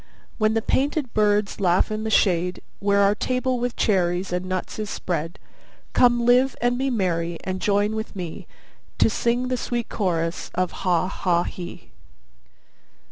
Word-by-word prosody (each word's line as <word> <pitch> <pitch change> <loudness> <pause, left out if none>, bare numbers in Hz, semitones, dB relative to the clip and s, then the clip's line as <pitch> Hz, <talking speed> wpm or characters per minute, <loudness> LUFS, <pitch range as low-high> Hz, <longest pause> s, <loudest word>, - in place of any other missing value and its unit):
When 215 0 +2
the 225 - +1
painted 280 0 0
birds 210 -1 +2
laugh 185 +1 +2
in 215 +1 -3
the - - -1
shade, 180 -4 +2 0.2
Where 200 0 +2
our 200 0 +5
table 255 +3 -1
with 245 0 -2
cherries 180 -2 +1
and 180 +1 -2
nuts 185 +3 -3
is 210 -1 -3
spread: 165 -3 -3 0.6
Come 240 -1 +4
live, 250 +2 +4
and 245 +1 +1
be 270 +2 0
merry, 175 -7 -1
and 185 0 -3
join 205 +1 +1
with 220 0 -5
me, 175 -4 -6 0.5
To - - +4
sing 240 +3 0
the 255 - 0
sweet 240 -1 -3
chorus 170 -4 -1
of 185 -1 0
'Ha 180 -2 0
ha 175 -2 +1
he! 175 -1 -8
205 Hz, 160 wpm, -23 LUFS, 180-235 Hz, 0.6 s, our